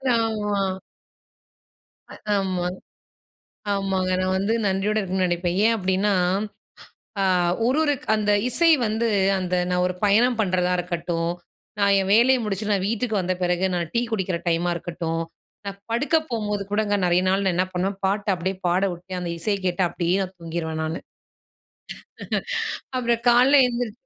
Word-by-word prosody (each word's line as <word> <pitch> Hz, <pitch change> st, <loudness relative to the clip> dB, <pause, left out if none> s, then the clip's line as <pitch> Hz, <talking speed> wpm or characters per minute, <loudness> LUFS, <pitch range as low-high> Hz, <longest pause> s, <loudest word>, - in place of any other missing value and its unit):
ஆமா. 215 Hz, -3 st, 0 dB, 1.5 s
அ -, -, -9 dB, 0.2 s
ஆமா. 185 Hz, -2 st, -1 dB, 1.1 s
ஆமாங்க. 190 Hz, -2 st, -1 dB
நான் 185 Hz, 0 st, 0 dB
வந்து 200 Hz, +3 st, 0 dB
நன்றியோடு 195 Hz, +2 st, 0 dB
இருக்கணுனு 190 Hz, -1 st, 0 dB
நினைப்பேன். 175 Hz, 0 st, -1 dB
ஏன் 230 Hz, -, +4 dB
அப்படின்னா, 190 Hz, +1 st, +1 dB, 1.1 s
அ -, -, +2 dB, 0.4 s
ஒரு 255 Hz, +3 st, +2 dB
ஒரு 295 Hz, -2 st, +2 dB
க் -, -, -16 dB
அந்த 210 Hz, -1 st, 0 dB, 0.2 s
இசை 330 Hz, +7 st, +4 dB, 0.2 s
வந்து 220 Hz, +2 st, 0 dB, 0.3 s
அந்த 185 Hz, -1 st, -2 dB, 0.2 s
நான் 180 Hz, 0 st, +1 dB
ஒரு 180 Hz, -, -2 dB
பயணம் 230 Hz, +4 st, +3 dB
பண்றதா 180 Hz, -3 st, +1 dB
இருக்கட்டும், 170 Hz, -1 st, -2 dB, 0.5 s
நான் 200 Hz, -1 st, +4 dB
என் 190 Hz, 0 st, -2 dB
வேலைய 255 Hz, +4 st, +5 dB
முடிச்சுட்டு 210 Hz, 0 st, -1 dB
நான் 190 Hz, -1 st, -1 dB
வீட்டுக்கு 220 Hz, -2 st, -1 dB
வந்த 185 Hz, 0 st, -1 dB
பிறகு 180 Hz, +1 st, +1 dB
நான் 170 Hz, -2 st, -2 dB
டீ 235 Hz, -, +2 dB
குடிக்கிற 190 Hz, -5 st, -1 dB
டைமா 170 Hz, +1 st, +1 dB
இருக்கட்டும், 165 Hz, -1 st, -3 dB, 0.4 s
நான் 200 Hz, 0 st, -6 dB
படுக்க 285 Hz, +7 st, +2 dB
போம்போது 210 Hz, -3 st, -2 dB
கூடங்க, 205 Hz, -1 st, +1 dB
நிறைய 175 Hz, +1 st, +3 dB
நாள் 195 Hz, +1 st, +1 dB
நான் 185 Hz, -, +2 dB
என்ன 185 Hz, -, +2 dB
பண்ணுவேன், 190 Hz, +2 st, -1 dB
பாட்ட 200 Hz, +1 st, -1 dB
அப்படியே 185 Hz, +2 st, -3 dB
பாடவுட்டு 180 Hz, 0 st, -1 dB
அந்த 175 Hz, -, -4 dB
இசைய 200 Hz, +4 st, 0 dB
கேட்டு 180 Hz, +1 st, +1 dB
அப்படியே 175 Hz, +1 st, 0 dB
நான் 185 Hz, 0 st, -7 dB
தூங்கிருவேன் 160 Hz, -1 st, -4 dB
நானு. 160 Hz, +1 st, -3 dB, 2.0 s
அப்புறம் 235 Hz, -1 st, 0 dB
காலைல 255 Hz, +4 st, +6 dB
எந்திரு 240 Hz, -2 st, -3 dB
190 Hz, 145 wpm, -23 LUFS, 180-215 Hz, 2.0 s, காலைல